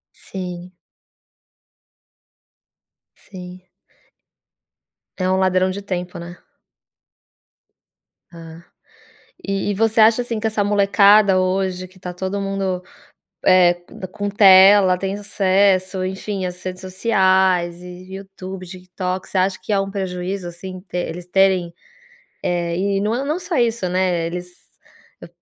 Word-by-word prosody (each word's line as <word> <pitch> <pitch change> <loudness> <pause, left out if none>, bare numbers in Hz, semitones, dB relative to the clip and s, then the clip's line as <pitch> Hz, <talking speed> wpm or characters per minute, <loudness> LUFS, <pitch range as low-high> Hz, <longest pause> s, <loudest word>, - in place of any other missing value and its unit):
Sim. 180 -1 -8 2.4
Sim. 180 -1 -11 1.6
É 185 - -1
um 185 - +2
ladrão 185 0 +2
de 195 +2 -5
tempo, 180 -3 -5
né. 170 +1 -9 1.9
Ah, 165 -1 -12 0.8
e 195 0 -2
e - - -1
você 225 +2 +2
acha, 220 +2 +5
assim, 230 -2 -4
que 220 - -2
essa 215 -2 0
molecada 200 0 +4
hoje 185 0 -1
que 185 +1 -21
tá 180 -1 -6
todo 190 +3 -4
mundo, 195 -2 -2 0.6
é 180 -2 +5
co 175 +1 -19
d 185 - -4
com 205 +2 -4
tela, 195 -2 +6
tem 195 +1 -3
acesso, 195 -2 +1
enfim, 190 +1 -4
as 180 0 -7
redes 185 0 -6
sociais 185 -3 +1
e, 180 +1 -10
Youtube, 190 -1 -9
TikTok, 185 +1 -5
você 190 - -2
acha 185 +1 +1
que 200 - -4
é 200 - +2
um 195 0 -3
prejuízo, 185 -1 -4
assim, 185 +2 -9
te 180 -1 -9
eles 175 0 -5
terem, 185 -2 +2 0.7
eh, 170 -1 -1
e 195 +1 0
não 210 +3 0
é 260 +3 -2
não 305 +4 -1
só 360 -2 -4
isso, 230 -5 0
né, 180 -2 0
eles, 180 +1 -6 0.7
eu - - -11
185 Hz, 130 wpm, -20 LUFS, 180-200 Hz, 2.4 s, tela